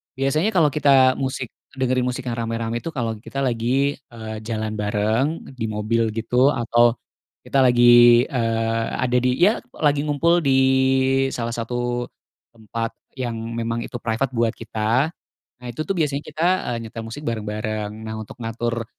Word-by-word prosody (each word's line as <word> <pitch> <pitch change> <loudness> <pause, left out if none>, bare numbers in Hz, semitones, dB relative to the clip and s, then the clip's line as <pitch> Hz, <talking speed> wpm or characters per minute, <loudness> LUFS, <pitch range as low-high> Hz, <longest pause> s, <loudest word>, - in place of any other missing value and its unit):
biasanya 135 +8 +1
kalau 155 -5 +4
kita. 135 -3 +5
musik, 130 -2 -3 0.2
dengerin 130 -1 0
musik 125 0 -3
yang 120 -1 -3
rame-rame 115 0 -2
itu 165 - -9
kalau 115 -4 -2
kita 135 +5 -4
lagi, 130 +4 0
eee, 110 -2 -8
jalan 110 -1 -2
bareng 110 +9 0 0.2
di 110 - -1
mobil 110 +2 0
gitu, 125 +4 +2
atau 120 0 +3 0.5
kita 135 - 0
lagi, 120 0 +7
eee, 115 -2 0
ada 125 -1 +1
di 125 0 +1
ya 210 +5 +4 0.2
lagi 145 -1 +1
ngumpul 165 +4 +3
di 140 -5 +2 0.8
salah 115 -1 -3
satu 120 +1 -2 0.5
tempat 115 +1 -5 0.2
yang 120 -3 -2 0.2
memang 115 0 -2
itu 120 0 -7
private 115 +4 -1
buat 115 -1 0
kita. 115 +7 0 0.5
Nah 125 - -11
itu 120 +5 -4
tuh 195 - 0
biasanya 150 -3 0
kita, 160 - -2 0.3
eee, - - -3
nyetel 115 +1 -7
musik 145 +7 -8
bareng-bareng. 110 -1 -3
Nah 110 0 -5
untuk 110 - -9
ngatur, 115 +1 -2
120 Hz, 155 wpm, -22 LUFS, 115-135 Hz, 0.8 s, lagi